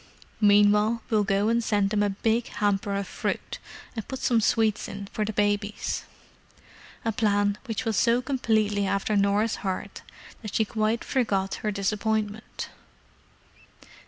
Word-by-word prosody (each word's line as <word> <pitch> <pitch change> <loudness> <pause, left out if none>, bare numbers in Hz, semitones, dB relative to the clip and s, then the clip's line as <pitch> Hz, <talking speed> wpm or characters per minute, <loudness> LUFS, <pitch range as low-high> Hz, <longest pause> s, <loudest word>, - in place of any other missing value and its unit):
Meanwhile 210 +2 +4
we'll 215 -2 +3
go 200 +1 +1
and 235 0 +2
send 205 -2 +1
them 210 -1 +2
a 205 - +2
big 225 +4 0
hamper 200 -1 0
of 200 0 -2
fruit, - - -3 0.4
and 220 - -5
put 265 - -4
some 235 -3 +2
sweets 220 -1 +2
in 200 0 -6
for 215 - -1
the 215 - -2
babies." 205 0 -1 1.0
A 225 - +2
plan 205 -2 +1
which 225 0 -3
was 225 -2 0
so 235 0 +4
completely 220 -6 +1
after 200 +2 0
Norah's 205 +2 +2
heart 190 -2 -4 0.4
that 215 -3 -6
she 220 - +3
quite 220 +2 0
forgot 195 -7 0
her 215 - -1
disappointment. 210 +1 -2
210 Hz, 145 wpm, -26 LUFS, 205-225 Hz, 1.0 s, Meanwhile